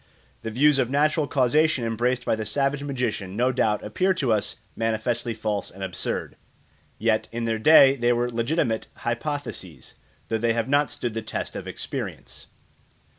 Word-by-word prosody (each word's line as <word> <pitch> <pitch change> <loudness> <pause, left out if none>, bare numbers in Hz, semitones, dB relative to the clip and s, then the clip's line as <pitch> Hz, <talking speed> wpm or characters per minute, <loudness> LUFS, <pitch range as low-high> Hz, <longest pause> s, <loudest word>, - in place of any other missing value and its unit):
The 115 - -4
views 140 +5 +4
of 125 -2 +1
natural 150 +2 +2
causation 140 0 +2
embraced 120 +3 0
by - - +2
the 110 - -4
savage 140 +6 0
magician 125 -9 -3
no 125 +3 +2
doubt 110 -4 +1
appear 185 - +1
to 130 -9 +1
us 105 -2 -1 0.2
manifestly 115 +1 -1
false 105 -2 -2
and 95 +1 -9
absurd; 95 -1 -3 0.6
yet 110 0 +1
in 120 +1 -3
their 115 -1 -1
day 135 +1 +7
they 120 -2 +2
were 120 0 +1
legitimate 120 0 -1
hypotheses, 120 - -5 0.3
though 110 - -1
they 115 0 +2
have 115 -1 -1
not 145 0 +3
stood 120 0 -4
the 115 - -3
test 110 - -5
of - - -6
experience. - - -6
120 Hz, 165 wpm, -25 LUFS, 110-140 Hz, 0.6 s, day